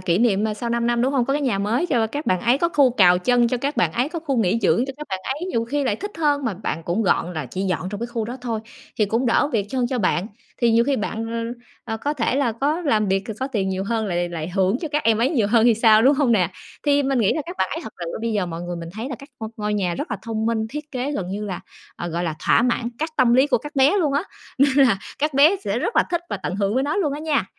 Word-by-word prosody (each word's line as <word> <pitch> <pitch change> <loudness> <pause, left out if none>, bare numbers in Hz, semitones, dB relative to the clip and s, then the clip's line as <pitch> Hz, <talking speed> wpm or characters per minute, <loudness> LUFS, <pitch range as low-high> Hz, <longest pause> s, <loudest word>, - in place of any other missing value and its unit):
kỷ 180 0 +1
niệm, 215 -3 +2
ờ, 215 -1 -1
sau 235 +2 -4
5 235 0 0
năm, 240 0 +1
đúng 265 +2 +1
hông? 255 -3 +2
Có 275 - -1
cái 290 0 0
nhà 240 -7 0
mới 230 - 0
cho 235 -8 +1
các 290 +7 -5
bạn 185 -1 +2
ấy, 245 +3 +3
có 340 - +2
khu 280 -6 +4
cào 180 -6 +5
chân 240 +4 +3
cho 250 - 0
các 280 +4 -3
bạn 160 -3 +2
ấy, 250 +7 0
có 335 0 -4
khu 285 -5 -2
nghỉ 220 0 +2
dưỡng 245 - +3
cho 270 - -5
các 300 - -8
bạn 190 - -2 0.2
ấy, 345 +5 -5
nhiều 230 -7 0
khi 280 +4 -1
lại 210 -5 0
thích 410 +2 -6
hơn, 290 -3 +1
mà 220 -5 -1
bạn 175 -4 -4
cũng 180 +6 0
gọn 180 -2 +1
là 155 -2 -4
chỉ 185 - -5
dọn 185 -1 -1
trong 205 - -5
cái 235 - -2
khu 235 -2 -3
đó 245 +3 -5
thôi, 230 -3 -3 0.4
thì 210 - +4
cũng 230 +5 0
đỡ 245 +5 +3
việc 205 -3 0
chân 255 -2 0
cho 250 0 -2
bạn. 185 -1 +1 0.3
Thì 235 -2 +3
nhiều 230 +1 +4
khi 280 -1 +1
bạn, 220 +2 -3 0.3
ờ, - - -25 0.2
ờ, 225 - -3
có 285 +6 -2
thể 255 -1 0
là 260 -5 +1
có 290 +8 -1
làm 215 - +1
việc 195 0 +2
c - - -5
có 265 - 0
tiền 205 -8 -1
nhiều 190 0 -2
hơn, 220 0 -1
lại 175 -1 -1
lại 165 -1 -5
hưởng 190 +5 +1
cho 320 - -4
các 300 +1 -1
em 225 -1 +3
ấy 250 +5 +2
nhiều 230 -10 +2
hơn 230 +1 +3
thì 235 -2 +5
sao, 220 -1 +5
đúng 275 +3 +5
hông 270 -4 +2
nè? 180 -5 +2 0.4
Thì 285 0 +4
mình 270 -2 0
nghĩ 210 -4 +3
là 310 - -2
các 355 +1 -7
bạn - - +1
ấy 325 - -3
thật 220 - -8
sự 170 - -4
ơ, - - -5
bây 230 -1 -1
giờ 200 -4 0
mọi 165 0 -6
người 175 0 -4
mình 165 -1 -7
thấy 225 +6 -5
là 275 - -4
các 275 - -13
ngôi 220 - -5
ngôi 210 0 -2
nhà 180 -4 0
rất - - -5
là 210 - -1
thông 220 -1 -2
minh, 230 -1 +1
thiết 300 0 -7
kế 265 +2 -3
gần 185 -8 -3
như 205 +2 -4
là, 185 -3 -4 0.4
ờ, 175 - -4
gọi 170 +2 -2
là, 160 -2 -2
thỏa - - +5
mãn 235 -1 0
các 315 +1 -2
tâm 245 -3 +4
lý 265 +3 +5
của 250 -5 +2
các 295 +4 -10
bé 275 +9 +5
luôn 300 -6 +1
á, 285 +4 +1 0.4
nên 275 0 +4
là 205 -5 +2 0.2
các 300 -1 0
bé 305 +8 +6
sẽ - - -1
rất - - -2
là - - +6
thích 345 -1 0
và - - -1
tận 180 - -4
hưởng 200 +1 0
với 260 - +2
nó 290 +5 -1
luôn 310 -8 +1
á 295 - -5
nha, 310 -3 +1
235 Hz, 320 wpm, -22 LUFS, 205-275 Hz, 0.4 s, bé